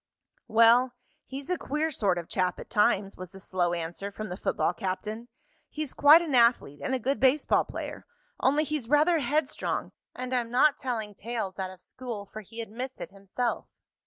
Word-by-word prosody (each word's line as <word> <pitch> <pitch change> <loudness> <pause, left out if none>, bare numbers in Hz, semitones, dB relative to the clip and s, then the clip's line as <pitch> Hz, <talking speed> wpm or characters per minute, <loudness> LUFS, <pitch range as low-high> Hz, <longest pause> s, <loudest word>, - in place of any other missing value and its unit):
"Well, 230 +3 +5 0.3
he's 275 +5 -6
a 360 - 0
queer 305 +3 -1
sort 200 -9 +1
of 170 -1 -5
chap 185 -1 0
at - - -10
times," 200 -1 +2
was 185 -1 -7
the 195 - -12
slow 180 -2 0
answer 175 +4 -5
from 215 +1 -6
the 180 - -4
football 170 -2 0
captain. 210 +6 -4 0.4
"He's 305 -3 -4
quite 305 +4 +7
an 310 -4 -3
athlete, 235 - +3
and 265 - 0
a - - +2
good 265 +3 -1
baseball 270 +3 +3
player. - - -7 0.3
Only 290 +3 +3
he's 300 -6 -3
rather 310 +3 +4
headstrong, 295 +4 -1 0.2
and 255 0 -4
I'm 240 -2 0
not 270 +5 +4
telling 225 -6 -3
tales 205 -3 -4
out 190 -1 -2
of 185 -1 -13
school, 235 -4 -7
for 215 +2 -9
he 225 +3 -8
admits 245 +4 -6
it 170 - -7
himself. 200 +5 -3
230 Hz, 185 wpm, -28 LUFS, 195-265 Hz, 0.4 s, quite